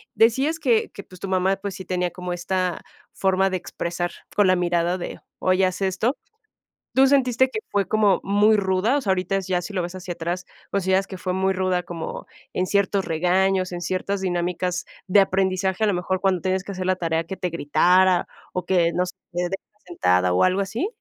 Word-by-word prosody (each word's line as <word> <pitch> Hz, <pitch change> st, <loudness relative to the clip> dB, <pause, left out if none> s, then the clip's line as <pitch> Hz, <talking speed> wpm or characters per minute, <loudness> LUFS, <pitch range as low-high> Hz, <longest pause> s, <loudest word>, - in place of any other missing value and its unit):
Decías 265 Hz, +8 st, +3 dB
que 245 Hz, -7 st, +2 dB
que, 200 Hz, -, -9 dB
pues, 185 Hz, -1 st, -15 dB
tu -, -, -4 dB
mamá, 190 Hz, +1 st, +2 dB
pues, 195 Hz, -1 st, -5 dB
sí 190 Hz, -, -8 dB
tenía 180 Hz, 0 st, -1 dB
como 180 Hz, 0 st, -5 dB
esta 180 Hz, 0 st, -1 dB, 0.3 s
forma 190 Hz, 0 st, +2 dB
de 185 Hz, -, 0 dB
expresar 175 Hz, 0 st, -4 dB, 0.2 s
con 205 Hz, -2 st, +4 dB
la 185 Hz, -, +5 dB
mirada 175 Hz, 0 st, +1 dB
de, 175 Hz, -, -6 dB, 0.2 s
oye, 185 Hz, +1 st, +3 dB
haz 185 Hz, +1 st, -5 dB
esto. 195 Hz, +7 st, 0 dB, 0.8 s
¿Tú 270 Hz, +1 st, +6 dB
sentiste 260 Hz, -2 st, +3 dB
que 350 Hz, -, -3 dB
fue 200 Hz, -1 st, +1 dB
como 210 Hz, -4 st, +3 dB
muy 205 Hz, +2 st, +4 dB
ruda? 195 Hz, +6 st, +1 dB
O -, -, -1 dB
sea, 200 Hz, -, 0 dB
ahorita 190 Hz, +1 st, 0 dB
ya 185 Hz, -2 st, -1 dB
si 205 Hz, -, -7 dB
lo 185 Hz, -, 0 dB
ves 175 Hz, +1 st, -5 dB
hacia 180 Hz, -1 st, -5 dB
atrás, 175 Hz, +2 st, -4 dB, 0.3 s
¿consideras 190 Hz, 0 st, +1 dB
que 190 Hz, -, -7 dB
fue 180 Hz, 0 st, -3 dB
muy 190 Hz, +1 st, +1 dB
ruda 185 Hz, -1 st, 0 dB
como 165 Hz, -2 st, -6 dB, 0.3 s
en 185 Hz, -, 0 dB
ciertos 200 Hz, 0 st, +1 dB
regaños, 185 Hz, +3 st, +1 dB
en 175 Hz, -, -5 dB
ciertas 185 Hz, +2 st, -2 dB
dinámicas 180 Hz, 0 st, -1 dB, 0.2 s
de 200 Hz, +2 st, +5 dB
aprendizaje, 190 Hz, +1 st, 0 dB
a -, -, +4 dB
lo 205 Hz, -, +2 dB
mejor 185 Hz, +1 st, -2 dB
cuando 190 Hz, -3 st, +1 dB
tienes 185 Hz, +1 st, 0 dB
que 200 Hz, -, -7 dB
hacer 185 Hz, -1 st, -4 dB
la 185 Hz, 0 st, +2 dB
tarea 165 Hz, -2 st, -1 dB
que 190 Hz, -, -5 dB
te 180 Hz, -, -2 dB
gritara, 180 Hz, +3 st, +3 dB, 0.3 s
o 180 Hz, -1 st, -3 dB
que 175 Hz, -3 st, +2 dB
no 180 Hz, -, +1 dB
sé, 180 Hz, -, -8 dB, 0.2 s
te 175 Hz, -, -1 dB
deje 195 Hz, -, -5 dB, 0.2 s
sentada 90 Hz, -, +2 dB
o 90 Hz, -, +3 dB
algo 185 Hz, +2 st, +2 dB
así? 220 Hz, -, -2 dB
185 Hz, 210 wpm, -23 LUFS, 180-195 Hz, 0.8 s, Tú